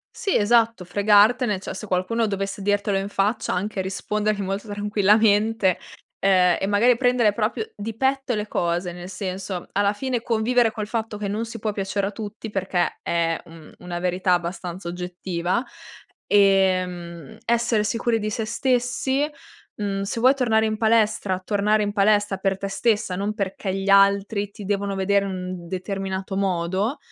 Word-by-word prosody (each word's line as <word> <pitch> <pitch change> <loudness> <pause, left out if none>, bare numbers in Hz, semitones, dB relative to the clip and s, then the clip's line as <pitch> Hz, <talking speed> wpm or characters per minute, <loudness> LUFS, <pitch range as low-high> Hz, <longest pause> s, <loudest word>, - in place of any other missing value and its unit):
Sì, 395 - -1
esatto 225 -1 +3
fregartene, 205 +4 +3
cioè - - -6
se 205 +3 -7
qualcuno 210 +5 0
dovesse 195 0 -3
dirtelo 205 0 +1
in 195 +1 -2
faccia 205 +3 0
anche 200 +2 -2
rispondergli 205 +3 -1
molto 195 +2 -3
tranquillamente, 205 0 +2 0.4
ehm, 185 -2 +4
e 195 - -1
magari 225 +4 +4
prendere 245 -3 +3
proprio 225 - -2
di 220 +2 -5
petto 265 +1 0
le 210 0 -3
cose, 175 +1 -1
nel 175 +1 -8
senso 190 -2 -5
alla 200 0 +2
fine 250 +2 -2
convivere 230 0 +2
col 215 -3 -4
fatto 220 -1 -3
che 205 -1 -3
non 215 +3 -2
si 230 0 -8
può 215 0 -1
piacere 195 0 -2
a - - -4
tutti, 215 +1 -7
perché 190 -3 -1
è 165 -1 0
un 165 -2 -14
una 175 -1 -5
verità 180 +1 +1
abbastanza 175 0 -3
oggettiva, 180 +3 -2 0.6
ehm, 185 -5 +1
essere 235 -2 +1
sicuri 230 +1 0
di 215 0 -2
se 220 +2 -2
stessi 260 +4 0 0.5
mhmm, 200 -1 -2
se 200 +3 -3
vuoi 260 +4 +5
tornare 225 -4 +2
in 215 0 0
palestra, 215 -4 +2
tornare 210 +2 +1
in 205 0 -2
palestra 205 0 +3
per 190 0 -1
te 195 - -4
stessa, 210 -1 0
non 200 +3 -2
perché 195 -2 -3
gli 195 0 -3
altri 200 +1 +3
ti 205 - -10
devono 200 0 -1
vedere 200 +1 +2
in 200 - -3
un 185 -2 -6
determinato 190 +1 -4
modo. 190 - 0
200 Hz, 160 wpm, -23 LUFS, 190-220 Hz, 0.6 s, vuoi